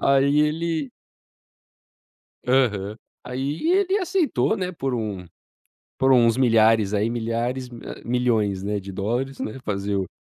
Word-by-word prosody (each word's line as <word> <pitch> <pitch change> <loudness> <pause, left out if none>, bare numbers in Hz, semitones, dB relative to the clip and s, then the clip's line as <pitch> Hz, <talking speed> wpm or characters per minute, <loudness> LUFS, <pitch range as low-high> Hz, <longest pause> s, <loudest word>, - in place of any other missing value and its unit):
Aí, 140 +2 +4
ele 155 -1 -1 1.6
Aham. 110 -6 +1 0.3
Aí 135 - -2
ele 390 +1 +3
aceitou, 365 - +1
né, 185 -3 -3
por 135 -6 -3
um 105 -6 -3 0.7
por 135 0 +3
uns 120 -2 +5
milhares 115 -4 +4
aí, 105 +3 +1
milhares 120 +2 -2
hã, 120 -1 -9
milhões, 115 -6 0
né, 105 +1 -1
de 100 0 -8
dólares, 120 +8 -2
né. 110 +5 -5
Fazer 100 -1 -2
o 95 -2 -2
125 Hz, 130 wpm, -23 LUFS, 105-140 Hz, 1.6 s, uns